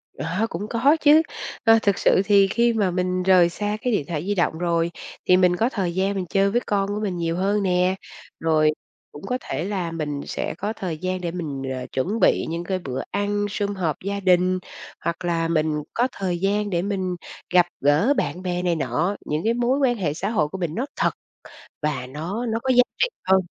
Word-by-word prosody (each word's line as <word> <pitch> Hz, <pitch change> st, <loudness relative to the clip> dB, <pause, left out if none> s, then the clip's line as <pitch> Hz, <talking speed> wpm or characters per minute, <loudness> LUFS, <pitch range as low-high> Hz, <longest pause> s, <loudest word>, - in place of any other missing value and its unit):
Ờ, 180 Hz, +8 st, -1 dB
cũng 195 Hz, +5 st, -5 dB
có 275 Hz, +7 st, +3 dB
chứ! 310 Hz, +1 st, +6 dB, 0.4 s
Ơ, 225 Hz, -2 st, +6 dB
thực 200 Hz, -2 st, +2 dB
sự -, -, +4 dB
thì 200 Hz, -1 st, +5 dB
khi 235 Hz, +4 st, +2 dB
mà 205 Hz, -5 st, +1 dB
mình 180 Hz, 0 st, -1 dB
rời 180 Hz, -2 st, +5 dB
xa 210 Hz, +4 st, -2 dB
cái 250 Hz, -, 0 dB
điện 175 Hz, -9 st, 0 dB
thoại 160 Hz, -1 st, -3 dB
di 205 Hz, -, 0 dB
động 175 Hz, -3 st, +1 dB
rồi 170 Hz, 0 st, 0 dB, 0.3 s
thì 180 Hz, -, +5 dB
mình 180 Hz, -1 st, +4 dB
có 225 Hz, +6 st, +1 dB
thời 190 Hz, -8 st, -2 dB
gian 195 Hz, +2 st, +1 dB
mình 190 Hz, -2 st, -2 dB
chơi 195 Hz, +1 st, +2 dB
với 240 Hz, +3 st, +1 dB
con 200 Hz, -1 st, 0 dB
của 205 Hz, +1 st, -2 dB
mình 195 Hz, -4 st, -2 dB
nhiều 165 Hz, -1 st, -1 dB
hơn 200 Hz, +2 st, +1 dB
nè, 180 Hz, 0 st, +2 dB, 0.4 s
rồi 155 Hz, -1 st, +3 dB, 0.4 s
cũng 145 Hz, -, -11 dB
có 250 Hz, -, 0 dB
thể 165 Hz, -, -3 dB
là 185 Hz, -4 st, -2 dB
mình 150 Hz, -3 st, -3 dB
sẽ -, -, -3 dB
có 205 Hz, +4 st, -2 dB
thời 180 Hz, -7 st, -4 dB
gian 185 Hz, +2 st, -3 dB
để 170 Hz, -1 st, -2 dB
mình, 155 Hz, -6 st, -4 dB
ờ, 130 Hz, -1 st, -5 dB
chuẩn 195 Hz, -, -1 dB
bị -, -, +3 dB
những 165 Hz, +1 st, -3 dB
cái 185 Hz, +1 st, -2 dB
bữa 130 Hz, -7 st, -4 dB
ăn 205 Hz, +1 st, 0 dB
sum 205 Hz, 0 st, -2 dB
họp 165 Hz, -6 st, -1 dB
gia 200 Hz, +1 st, -2 dB
đình, 185 Hz, -1 st, +3 dB, 0.4 s
hoặc 170 Hz, +2 st, -3 dB
là 165 Hz, -1 st, 0 dB
mình 155 Hz, -2 st, 0 dB
có 245 Hz, +2 st, +2 dB
thời 185 Hz, -3 st, -2 dB
gian 205 Hz, +2 st, 0 dB
để 175 Hz, -3 st, 0 dB
mình 190 Hz, -2 st, -2 dB, 0.4 s
gặp 180 Hz, -1 st, +6 dB, 0.2 s
gỡ 150 Hz, -, +4 dB
bạn 145 Hz, +5 st, -1 dB
bè 180 Hz, -1 st, -2 dB
này 175 Hz, -1 st, +1 dB
nọ, 155 Hz, +7 st, 0 dB
những 150 Hz, +1 st, -1 dB
cái 225 Hz, -, +2 dB
mối 245 Hz, +3 st, +1 dB
quan 260 Hz, -3 st, +3 dB
hệ 170 Hz, -8 st, -1 dB
xã 195 Hz, +6 st, -3 dB
hội 200 Hz, -10 st, +1 dB
của 170 Hz, -, -7 dB
mình 170 Hz, -4 st, -3 dB
nó 245 Hz, -, -1 dB
thật -, -, +2 dB, 0.7 s
và 140 Hz, -5 st, -2 dB
nó 170 Hz, -, -4 dB
nó 225 Hz, -1 st, -1 dB
có 265 Hz, -, -2 dB
giá 250 Hz, -, +7 dB, 0.2 s
trị -, -, +3 dB, 0.2 s
hơn. 190 Hz, 0 st, +5 dB
185 Hz, 225 wpm, -23 LUFS, 170-205 Hz, 0.7 s, giá